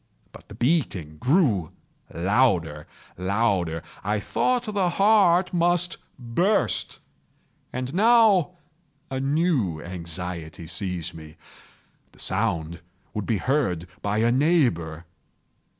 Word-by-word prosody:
But - - -15
the - - -11
beating 120 - -1
grew 125 - +2 0.4
louder, 85 - +1 0.3
louder! 90 -4 0 0.2
I 105 +1 0
thought 245 - 0
the 205 -5 0
heart 190 -2 +4
must 175 0 +2 0.2
burst. 170 - 0 0.7
And 125 +2 -4
now 210 -4 +4 0.6
a 130 - -2
new 135 - 0
anxiety 85 0 -6
seized 90 -1 -3
me—the 80 0 -18
sound 80 +1 -2 0.3
would 105 -3 -4
be 115 - +1
heard 110 - 0 0.2
by 100 +1 -1
a 115 +2 +3
neighbour! 120 - +1
115 Hz, 100 wpm, -24 LUFS, -, 0.7 s, heart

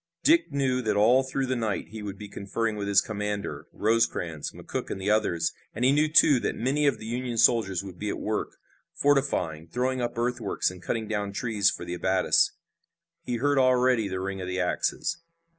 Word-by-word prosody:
Dick 330 - +4
knew 130 -2 0
that 110 -4 0
all 115 +6 +5
through 135 0 -2
the 130 0 -1
night 110 -4 -2
he 110 0 -8
would 100 -1 -6
be 105 - -8
conferring 105 +3 -3
with 100 -1 -4
his 100 -1 +5
commander, 105 -1 -4
Rosecrans, 105 -8 0
McCook - - -6
and - - -4
the 100 +2 0
others, 85 -6 +1 0.2
and 120 +4 0
he 130 - +5
knew, 150 +2 +2
too, 150 -4 +6
that - - -2
many 140 +5 +1
of 135 -5 +2
the 110 - -10
Union 120 +1 -3
soldiers 100 -6 +3
would 95 -3 -10
be 105 - -3
at - - -3
work, 110 0 -3 0.4
fortifying, 130 - +1
throwing 125 +7 -1
up 120 0 -3
earthworks, 120 -5 -1
and 90 -1 -12
cutting 110 +3 -3
down 105 -2 -2
trees 105 -2 +1
for - - -5
abattis. 95 +2 +2 0.7
He 125 - -3
heard 140 +3 +2
already 125 -3 +3
the 95 -1 -3
ring 95 0 -4
of 90 - -5
the 90 0 -2
axes. 90 - -1
110 Hz, 195 wpm, -27 LUFS, 100-130 Hz, 0.7 s, too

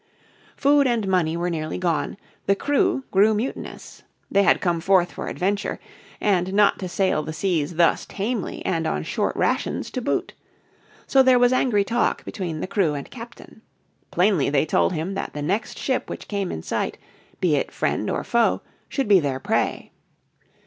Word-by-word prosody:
Food 285 0 +4
and 230 -5 0
money 170 -4 +1
were 175 +1 -1
nearly 155 -1 -3
gone, 175 0 -1 0.3
the 200 - +4
crew 275 +2 +1
grew 210 +2 +4
mutinous. 230 +6 -5 0.3
They 200 - +4
had 200 - +4
come 170 -2 0
forth 180 -1 +3
for - - -6
adventure, 200 +3 -1 0.4
and 190 -2 +1
not 205 -1 +4
to 185 - -4
sail 185 -3 +1
the 155 +1 -6
seas 165 -3 -1
thus 170 0 +3
tamely 210 +1 -3
and 165 -2 0
on - - -1
short - - -1
rations - - -1
to 255 - -3
boot. 270 - -1 0.7
So 270 - +5
there 260 -1 +5
was 245 +1 +4
angry 235 -6 +2
talk 235 +3 0
between 170 -6 -4
the - - -1
crew 185 -8 +1
and 140 - -7
captain. 235 -2 -11 0.5
Plainly 180 -5 +2
they 145 +1 +2
told 160 - +2
him 165 +4 -3
that - - -4
the 150 - -4
next 200 +8 -2
ship 260 - -1
which - - -7
came 200 -3 -2
in 80 - -5
sight, - - -2 0.4
be 170 -5 +2
it 140 - -1
friend - - -1
or - - -1
foe, 235 -1 +1 0.3
should 275 -4 -1
be 200 -2 +6
their 140 -4 -2
prey. - - -1
195 Hz, 175 wpm, -23 LUFS, 165-225 Hz, 0.7 s, be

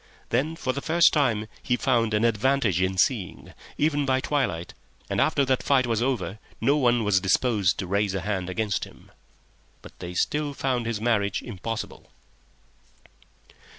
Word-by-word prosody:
Then 145 +7 0
for 130 -6 -2
the 140 - -4
first 170 +2 +4
time 120 -8 +1 0.2
he 125 - 0
found 115 -5 +1
an 105 +2 +2
advantage 115 -4 +2
in 95 0 0
seeing, 100 -3 -1 0.2
even 145 -1 +1
by 130 -1 +1
twilight, 130 - -2 0.4
and - - +1
after 140 - +2
that 130 -1 +1
fight 135 -2 +2
was 115 -2 0
over 110 -7 -2 0.2
no 135 +6 +3
one 120 -5 +2
was 105 -2 +3
disposed 100 0 +2
to 95 - -3
raise 100 +1 0
a 95 - -2
hand 95 -1 -2
against 105 +1 -1
him. - - -13 0.7
But - - -14
they 90 0 -7
still 145 +8 -1
found 125 -4 -1
his 115 -2 -2
marriage 105 -4 0
impossible. 115 0 -6
115 Hz, 160 wpm, -25 LUFS, 100-135 Hz, 0.7 s, first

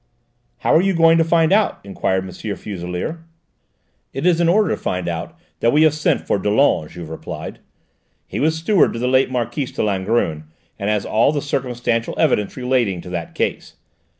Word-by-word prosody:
"How - - +2
are 160 - +6
you 195 0 +1
going 165 0 +5
to - - +5
find 165 +1 +3
out?" 210 +1 +2
enquired 95 -1 -1
M. 95 - -8
Fuselier. 100 - -5 0.9
"It 135 +4 -3
is 175 -1 +3
in 170 - +3
order 205 -1 +3
to - - +1
find 90 -1 -2
it - - 0
out 85 - -6 0.2
that 115 - +3
we 150 +4 +4
have 155 -2 +5
sent 155 0 +1
for - - 0
Dollon," 105 - +2
Juve 85 -2 -9
replied. 80 - -7 0.7
"He - - -5
was 160 +2 +2
steward 175 +3 +3
to - - -5
the 125 +2 -1
late 130 +1 +3
Marquise 125 +2 -2
de - - -2
Langrune, 95 -6 0 0.3
and 100 - -1
has 105 -2 0
all 115 +6 +3
the 150 - -1
circumstantial 125 -4 -2
evidence 105 -1 +1
relating 125 -7 0
to 90 - -10
that 85 -2 -5
case. - - -3
120 Hz, 190 wpm, -20 LUFS, 95-160 Hz, 0.9 s, are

